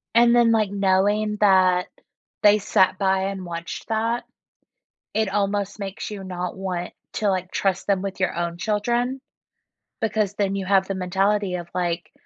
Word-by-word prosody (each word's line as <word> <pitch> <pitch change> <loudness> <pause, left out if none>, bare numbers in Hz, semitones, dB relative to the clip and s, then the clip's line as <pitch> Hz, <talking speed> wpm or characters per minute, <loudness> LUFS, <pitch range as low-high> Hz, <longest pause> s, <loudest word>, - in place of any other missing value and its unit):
And 235 0 +6
then, 235 -1 +5
like, 215 -3 +2
knowing 205 +2 +2
that 185 -3 +4 0.5
they 210 0 +6
sat 185 -2 +2
by 190 0 +1
and 195 -2 -4
watched 170 +5 -6
that, 225 +2 0 0.9
it 220 -1 +1
almost 200 +1 -1
makes 195 0 -5
you 205 -2 -6
not 180 -1 -5
want 180 -2 -4 0.2
to, 210 - 0
like, 185 -1 -1
trust 190 -2 -1
them 195 -2 +2
with 195 0 -5
your 185 - +1
own 170 0 -3
children, 240 +6 0 0.8
because 215 -2 0
then 195 -1 0
you 195 -1 -3
have 190 0 +3
the 195 - -3
mentality 195 +1 0
of 175 -1 -5
like, 175 -1 -2
195 Hz, 160 wpm, -23 LUFS, 185-210 Hz, 0.9 s, And